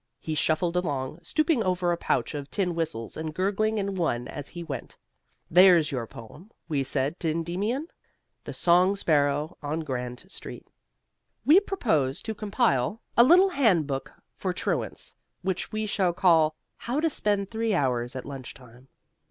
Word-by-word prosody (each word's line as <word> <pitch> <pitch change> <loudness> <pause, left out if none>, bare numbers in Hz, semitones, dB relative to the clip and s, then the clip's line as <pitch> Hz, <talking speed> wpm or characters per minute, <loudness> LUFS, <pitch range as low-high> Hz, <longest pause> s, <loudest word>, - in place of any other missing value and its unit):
He 160 - -4
shuffled 165 +3 +1
along, 145 -4 -2
stooping 305 - +1
over 180 -3 +1
a - - +2
pouch 170 - -1
of 145 -1 -6
tin 185 -4 -1
whistles 155 -10 -3
and 155 -1 -5
gurgling 205 +4 0
in 200 -1 -1
one 145 -10 -1
as 145 -2 -7
he 175 -1 -7
went. 140 -7 -7 0.5
There's 175 -3 +6
your 125 -4 -3
poem, 115 - -12 0.2
we 150 -4 0
said 140 +4 -1
to 165 - -1
Endymion 185 - -2 0.6
"The - - -6
Song 180 +3 +4
Sparrow 150 -3 +1
on 155 +2 -2
Grand 125 -1 -5
Street." - - -8 0.8
We 320 +6 +8
propose 160 - 0
to 220 - -3
compile 210 - 0 0.2
a 235 - +8
little 360 +8 +6
handbook 170 - +1 0.2
for - - -2
truants, - - -3 0.3
which 190 -1 -2
we 215 0 -2
shall 190 -4 +1
call 165 -4 +4 0.2
"How 245 +5 -2
to 325 - +2
Spend 205 -9 -1
Three 225 -2 0
Hours 125 -5 0
at 130 - -5
Lunch 135 -3 -8
Time." 125 0 -17
170 Hz, 160 wpm, -27 LUFS, 145-205 Hz, 0.8 s, We